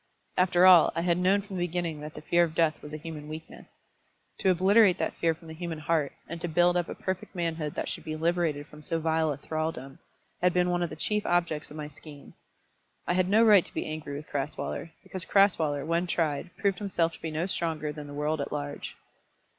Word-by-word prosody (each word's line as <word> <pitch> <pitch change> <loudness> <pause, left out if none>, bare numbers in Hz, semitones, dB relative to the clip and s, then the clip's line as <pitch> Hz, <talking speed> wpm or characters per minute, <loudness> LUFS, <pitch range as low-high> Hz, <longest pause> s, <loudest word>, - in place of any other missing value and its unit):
After 180 0 +4
all, 180 -3 +8
I 165 - 0
had 175 0 +1
known 195 +2 +3
from 195 -2 -7
the 175 0 0
beginning 170 -2 -3
that 150 +1 -8
the - - -9
fear 175 +2 +4
of 160 -2 -2
death 160 -2 +2
was 150 - -9
a 155 - -4
human 155 -1 -8
weakness. 155 +1 -10 0.7
To 190 - +2
obliterate 190 +2 +5
that - - -1
fear 165 -1 +1
from 165 +1 -16
the 160 - -8
human 165 0 -5
heart, 155 -1 0 0.2
and 170 -1 -6
to 175 - -2
build 175 +2 +3
up 175 -1 0
a - - -5
perfect 185 +1 -4
manhood 165 -3 -2
that - - -2
should - - -4
be 155 - -4
liberated 160 -2 0
from 150 0 -14
so 165 +2 -1
vile 160 -1 +1
a 140 - -4
thraldom, 155 -3 -4 0.4
had 180 0 +3
been 180 0 +3
one 175 0 0
of 175 - 0
the 155 - -7
chief 210 +6 -1
objects 170 -4 0
of 150 - -10
my 150 -1 -5
scheme. 150 -1 -13 0.7
I - - +1
had 185 0 +2
no 220 +3 +5
right 210 -5 +7
to - - -14
be - - -2
angry 155 -2 -5
with 150 +2 -7
Crasweller, 145 +4 -3
because 185 -2 -4
Crasweller, 160 -9 +3
when 170 +2 0
tried, 160 -1 -1
proved 200 -1 0
himself 175 -5 0
to - - -13
be 165 - -3
no 155 +2 -1
stronger 160 -5 -2
than 150 -1 -8
the 145 - -8
world 150 +1 -1
at 140 - -4
large. 145 -1 -5
165 Hz, 230 wpm, -28 LUFS, 155-180 Hz, 0.7 s, all